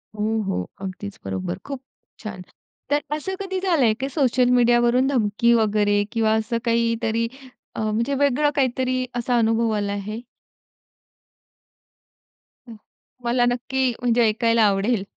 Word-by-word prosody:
हो, 220 +1 0
हो. 90 - -2
अगदीच 195 +1 -7
बरोबर. 95 -2 -3
खूप 275 -2 -6 0.4
छान. 210 -5 -7 0.5
तर 290 +1 +2
असं 380 +6 -4
कधी 380 -1 -3
झालंय 325 - +2
की 270 +1 -2
सोशल 255 -3 +2
मीडियावरून 240 +1 +3
धमकी 235 -2 +2
वगैरे? 210 -2 +2
किंवा 225 -2 +2
असं 220 +1 -1
काहीतरी 230 -1 +1 0.5
अ, - - -5
म्हणजे 230 +6 0
वेगळं 285 +1 +2
काहीतरी 255 -1 0
असा 245 0 0
अनुभव 225 0 +2
आला 205 -1 -1
आहे? 210 +3 -5 2.5
हं. 230 - -10 0.5
मला 240 +1 +2
नक्की 255 +2 0
म्हणजे 240 -1 +3
ऐकायला 230 +1 +2
आवडेल. 200 +2 +1
235 Hz, 125 wpm, -23 LUFS, 215-255 Hz, 2.5 s, मीडियावरून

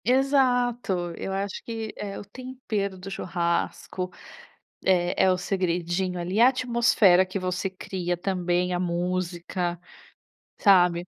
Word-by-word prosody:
Exato, 245 -8 +2
eu - - -5
acho 195 0 -3
que 225 -2 -5
é 200 -1 -5
o - - -8
tempero 215 -4 -4
do 190 +2 -8
churrasco, 180 +1 -2 0.7
eh, 180 -2 +2
é 190 - +4
o 185 - +1
segredinho 180 -1 -1
ali, 180 +4 -2
a 240 - +9
atmosfera 235 -7 +4
que 185 +1 -5
você 185 0 -2
cria 185 -1 -4
também, 180 -1 0
a 175 - 0
música, 175 0 -2 0.8
sabe. 180 -3 +4
185 Hz, 125 wpm, -26 LUFS, 175-210 Hz, 0.8 s, a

